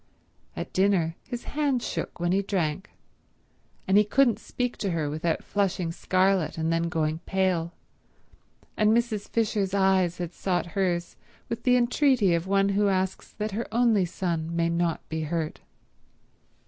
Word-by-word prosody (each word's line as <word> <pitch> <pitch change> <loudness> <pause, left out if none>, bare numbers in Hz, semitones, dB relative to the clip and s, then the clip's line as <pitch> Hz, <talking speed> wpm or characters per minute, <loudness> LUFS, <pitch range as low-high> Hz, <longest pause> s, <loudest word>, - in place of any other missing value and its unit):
At - - -6
dinner 185 -4 +2
his 245 -2 -6
hand 285 -5 0
shook - - -4
when 175 0 0
he 195 +2 +3
drank, 190 -3 -2 1.0
and 195 +2 +5
he - - +5
couldn't 235 0 +3
speak 245 +1 -3
to 200 - -2
her 160 -4 -1
without 160 +2 -1
flushing 190 -4 -1
scarlet 185 -1 +1
and 160 +1 0
then 165 0 0
going 160 -2 -1
pale, 185 -3 0 1.0
and 215 +1 +4
Mrs. 230 -4 -2
Fisher's 210 -4 0
eyes 190 -3 +2
had 175 -1 -5
sought 180 -1 -1
hers 175 -3 -1 0.3
with 230 - -3
the 250 -1 +4
entreaty 245 - +3
of 170 +2 -1
one 195 0 +3
who 200 +1 +2
asks 190 -1 -1
that 210 +1 -3
her 225 +4 -3
only 225 -4 +3
son 170 -2 -3
may 170 0 +1
not 170 -1 -1
be 160 0 -3
hurt. 160 0 -3
190 Hz, 155 wpm, -26 LUFS, 170-210 Hz, 1.0 s, and